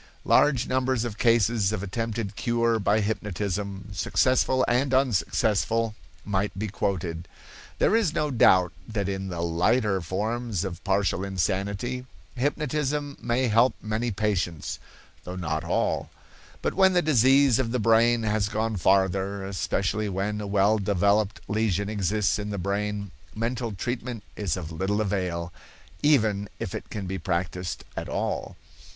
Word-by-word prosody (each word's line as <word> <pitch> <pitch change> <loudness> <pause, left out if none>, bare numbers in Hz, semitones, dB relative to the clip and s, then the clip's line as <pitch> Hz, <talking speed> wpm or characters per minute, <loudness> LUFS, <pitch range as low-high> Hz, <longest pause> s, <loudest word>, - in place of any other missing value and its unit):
Large 130 -4 +4
numbers 130 -2 +1
of 110 -3 -6
cases 115 -3 +3
of 105 -3 -3
attempted 110 0 -3
cure 115 -1 +1
by 105 +2 +2
hypnotism, 100 -1 -3
successful 130 +5 +2
and 130 +2 +2
unsuccessful, 115 - +1 0.3
might 100 -1 -1
be 110 +2 -2
quoted. 90 -4 -2 0.5
There - - +3
is 220 -8 +2
no 150 -1 -1
doubt 95 -7 +5
that 105 -3 -2
in 95 -1 -3
the 85 -2 -4
lighter 95 +5 +1
forms 105 +3 -2
of 90 -2 -6
partial 95 -1 +1
insanity, 100 +7 -2 0.3
hypnotism 145 +1 -1
may 120 +2 +1
help 115 +3 +4
many 110 +3 -2
patients, 95 -6 -2 0.4
though 90 - -6
not 80 -3 -2
all; 85 - 0 0.5
but - - 0
when 190 -1 +4
the 175 -1 +3
disease 135 -2 +5
of 120 -3 0
the 125 - +1
brain 115 +1 +4
has 105 -2 0
gone 110 0 -1
farther, 95 +1 +1
especially 100 +2 -1
when 100 +2 -2
a 105 - -4
well 100 +2 +3
developed 100 +1 +1
lesion 100 -2 0
exists 105 0 0
in 105 0 -4
the 100 - -3
brain, 100 +1 -2 0.2
mental 115 +1 -2
treatment 120 +2 -4
is 95 -4 -1
of 85 -3 -6
little 95 +6 -1
avail, 90 -5 -2 0.5
even 110 -9 +2
if - - -5
it - - -6
can 105 -2 -5
be 95 +1 -4
practiced 90 +1 -3
at - - -4
all. - - -3
105 Hz, 145 wpm, -26 LUFS, 95-120 Hz, 0.5 s, doubt